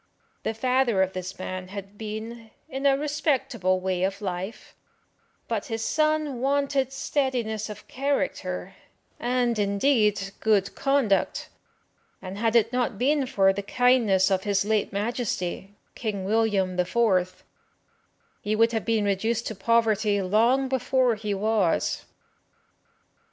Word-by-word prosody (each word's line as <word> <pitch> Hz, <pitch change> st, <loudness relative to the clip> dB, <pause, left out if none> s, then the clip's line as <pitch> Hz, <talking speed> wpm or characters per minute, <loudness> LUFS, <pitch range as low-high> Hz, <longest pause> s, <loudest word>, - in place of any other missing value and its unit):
The 220 Hz, -, -3 dB
father 250 Hz, -4 st, +2 dB
of 190 Hz, 0 st, -3 dB
this 185 Hz, +1 st, -6 dB
man 185 Hz, 0 st, -5 dB
had 200 Hz, +1 st, -8 dB
been 220 Hz, +2 st, -7 dB, 0.2 s
in 270 Hz, -1 st, -1 dB
a 270 Hz, -1 st, +4 dB
respectable 270 Hz, -, 0 dB
way 185 Hz, -1 st, -1 dB
of 195 Hz, +1 st, -1 dB
life, 190 Hz, +1 st, -5 dB, 0.7 s
but -, -, -2 dB
his 225 Hz, -2 st, -3 dB
son 305 Hz, -4 st, +1 dB
wanted 275 Hz, -1 st, +1 dB
steadiness 250 Hz, -6 st, -1 dB
of 210 Hz, 0 st, -9 dB
character, 275 Hz, +2 st, -2 dB, 0.5 s
and, 245 Hz, -2 st, 0 dB
indeed, 205 Hz, -1 st, +2 dB
good 205 Hz, -3 st, +2 dB
conduct, 275 Hz, -8 st, +1 dB, 0.7 s
and 190 Hz, +1 st, -7 dB
had 225 Hz, 0 st, +1 dB
it 230 Hz, +1 st, +3 dB
not 245 Hz, -3 st, 0 dB
been 275 Hz, +3 st, +1 dB
for 195 Hz, -6 st, +3 dB
the 200 Hz, -, -3 dB
kindness 210 Hz, -4 st, +3 dB
of 190 Hz, -1 st, +2 dB
his 200 Hz, -1 st, +1 dB
late 215 Hz, -1 st, 0 dB
Majesty, 200 Hz, -3 st, -3 dB, 0.2 s
King 205 Hz, -5 st, -4 dB
William 200 Hz, -3 st, +1 dB
the 180 Hz, -, +2 dB
Fourth, 185 Hz, -4 st, +1 dB, 1.0 s
he 210 Hz, +1 st, -1 dB
would 230 Hz, +1 st, +4 dB
have 225 Hz, -4 st, -2 dB
been 225 Hz, -2 st, +1 dB
reduced 220 Hz, +4 st, 0 dB
to -, -, -3 dB
poverty 215 Hz, 0 st, +2 dB
long 230 Hz, +8 st, +2 dB
before 260 Hz, -1 st, +2 dB
he 210 Hz, -2 st, -3 dB
was. 205 Hz, -3 st, 0 dB
220 Hz, 130 wpm, -26 LUFS, 195-250 Hz, 1.0 s, a